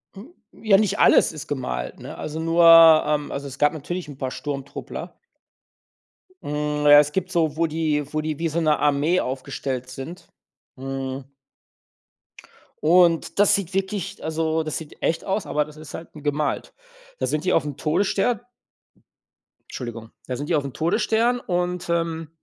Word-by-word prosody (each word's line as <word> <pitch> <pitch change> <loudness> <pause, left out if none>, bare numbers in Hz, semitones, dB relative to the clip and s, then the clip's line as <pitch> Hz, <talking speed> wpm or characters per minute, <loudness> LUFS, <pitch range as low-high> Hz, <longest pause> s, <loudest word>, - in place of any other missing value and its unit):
Hm, 230 - -12 0.2
ja, 215 -3 +3
nicht 210 -2 0
alles - - +5
ist 155 -1 -9
gemalt, 60 - -4
ne? - - -9
Also 155 +1 -5
nur 165 +1 +2 0.4
ähm, 150 -1 -1
also 140 0 -5
es 135 - -9
gab 145 +2 +3
natürlich 175 +3 -5
'n 145 -3 -10
paar 130 -2 -3
Sturmtruppler. 140 -2 -6 1.3
Hm, 150 0 -2
ja, 145 0 +9
es 150 0 +2
gibt 185 +1 -2
so 160 -4 0
wo 165 - +2
die 150 -2 -1
wo 155 - 0
die 155 -1 -3
wie 165 - -1
so 165 +2 -1
'ne 155 -1 +3
Armee 150 +5 +2
aufgestellt 130 0 -4
sind, 135 +7 -9 0.5
mhm. 135 0 -5 1.6
Und 170 +2 +3
das 205 - +5
sieht 195 -2 -4
wirklich 195 -1 -3
also 160 0 -1
das 155 -1 -3
sieht 160 -2 -11
echt 165 - -1
aus, 195 +1 -1
aber 150 0 0
das 150 0 -14
ist 155 -1 -11
halt 165 - -9
gemalt. 150 0 -2 0.4
Da - - -1
sind 155 0 -1
die - - +1
aufm 145 -3 0
Todesstern 200 +8 0 1.3
Entschuldigung. 115 -3 -7 0.2
Da 125 - -3
sind 145 +2 -5
die 165 - +2
auf 145 - +1
dem 135 -2 -6
Todesstern 225 +8 +1
und, 180 -4 -2
ähm 165 -2 -1
155 Hz, 165 wpm, -23 LUFS, 145-170 Hz, 1.6 s, ja